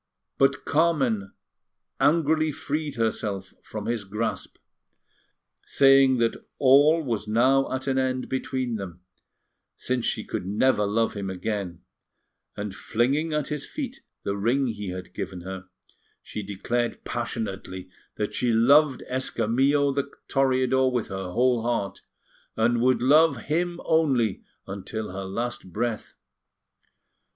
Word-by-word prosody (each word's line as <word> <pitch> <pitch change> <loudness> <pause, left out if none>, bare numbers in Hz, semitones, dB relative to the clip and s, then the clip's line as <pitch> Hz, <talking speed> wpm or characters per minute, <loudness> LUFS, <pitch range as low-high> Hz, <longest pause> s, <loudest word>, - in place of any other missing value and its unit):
But 135 0 +2
Carmen 135 - +1 0.7
angrily 155 +2 +3
freed 150 +1 -3
herself 105 -4 -2
from 105 -1 -7
his 115 -2 -1
grasp, 105 +4 -4 1.1
saying 135 -1 +5
that 115 -1 0
all 145 +4 +5
was 115 -5 -3
now 130 +5 +3
at 130 0 -2
an 135 -1 +1
end 130 -1 -1
between 130 -2 -2
them, 90 -3 -8 0.8
since 125 -1 -1
she - - -1
could 90 - -5
never 105 +1 +2
love 115 +3 +1
him 100 -2 -4
again; 95 -2 -4 0.7
and 100 -1 -4
flinging 135 +11 0
at 150 -2 -1
his 150 -2 -4
feet 275 -4 -6 0.2
the 100 - -2
ring 120 +7 +1
he 105 -3 -5
had 90 0 -7
given 95 -2 -5
her, 95 +1 -7 0.6
she 105 - -6
declared 110 +4 -2
passionately 100 -6 -4 0.3
that 105 - -3
she 125 -1 +1
loved 135 +5 +4
Escamillo 135 +3 +1
the 140 0 -2 0.2
Toreador 130 -1 +2
with 120 -3 -2
her 95 -1 -4
whole 125 +5 +2
heart, 115 -4 -2 0.6
and 115 +1 +2
would 125 -1 +3
love 150 +1 +5
him 170 +3 -1
only 135 - +2 0.2
until 100 +2 -5
her 95 +1 -5
last 115 -1 -4
breath. 115 +3 -3
120 Hz, 125 wpm, -26 LUFS, 105-135 Hz, 1.1 s, saying